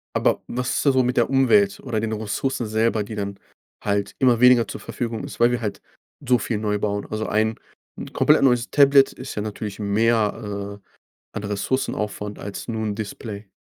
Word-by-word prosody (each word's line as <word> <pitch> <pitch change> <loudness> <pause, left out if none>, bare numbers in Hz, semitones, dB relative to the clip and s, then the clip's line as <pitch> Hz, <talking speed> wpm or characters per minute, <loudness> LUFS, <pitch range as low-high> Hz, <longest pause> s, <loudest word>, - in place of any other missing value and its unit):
Aber - - +2
was 125 +1 -3
ist - - -1
da 140 - +6
so 130 -1 +3
mit 125 0 -1
der 120 - +2
Umwelt 195 +10 +3
oder 110 - -2
den 110 0 -2
Ressourcen 110 +4 -2
selber, 110 0 +1
die 110 - -7
dann 100 -1 -4 0.4
halt 100 0 -1
immer 125 -3 +3
weniger 125 -2 +6
zur - - -7
Verfügung 115 -2 -4
ist, - - -8
weil 120 +1 +5
wir 120 0 -1
halt 100 -3 -4 0.4
so 125 0 +4
viel 110 -2 -2
neu 105 -1 -1
bauen? 100 0 -2
Also 110 0 -2
ein 110 +1 +1 0.4
'n - - -7
komplett - - +4
neues 125 -3 +3
Tablet 140 -1 +5
ist 130 0 -8
ja 105 - -2
natürlich 105 -1 -5
mehr, 105 -1 0
äh, - - -39 0.4
an - - -5
Ressourcenaufwand 105 -1 -2
als 100 0 -7
nur 110 -2 -3
'n 105 -1 -2
Display. 105 -1 -7
110 Hz, 195 wpm, -23 LUFS, 105-125 Hz, 0.4 s, da